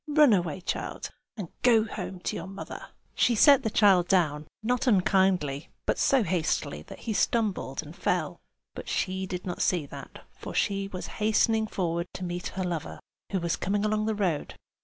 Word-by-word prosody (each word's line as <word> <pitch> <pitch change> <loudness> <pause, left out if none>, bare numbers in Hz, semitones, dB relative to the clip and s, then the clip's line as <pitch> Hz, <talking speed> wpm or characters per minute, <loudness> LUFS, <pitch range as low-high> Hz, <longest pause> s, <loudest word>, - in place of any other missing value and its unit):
Run 295 -5 +5
away, 175 -2 0
child, - - -4 0.3
and 190 -6 -5
go 230 -3 +5
home 185 -4 -6
to - - -2
your 165 - -5
mother!" 195 +1 -8 0.3
She 240 - +3
set 280 +4 +7
the 225 - -1
child 195 -5 +4
down, 155 -5 +1 0.2
not 250 +3 0
unkindly, 185 - +2 0.2
but - - 0
so 270 -4 +4
hastily 160 - -1
that - - -10
he 225 - -2
stumbled 215 -2 0
and - - -11
fell; - - -1 0.3
but - - -8
she 190 0 -1
did 180 -1 -5
not 180 -2 -4
see 175 -5 +1
that, - - -10
for - - -8
she 195 0 0
was 185 -2 -6 0.2
hastening 220 +1 +3
forward 170 -3 -2
to 185 - -5
meet 175 0 -3
her 190 - 0
lover, 170 -4 -4 0.3
who 195 - 0
was 170 -1 0
coming 205 +2 -1
along 215 0 0
the 220 - 0
road. 180 -8 -1
190 Hz, 180 wpm, -28 LUFS, 175-215 Hz, 0.3 s, set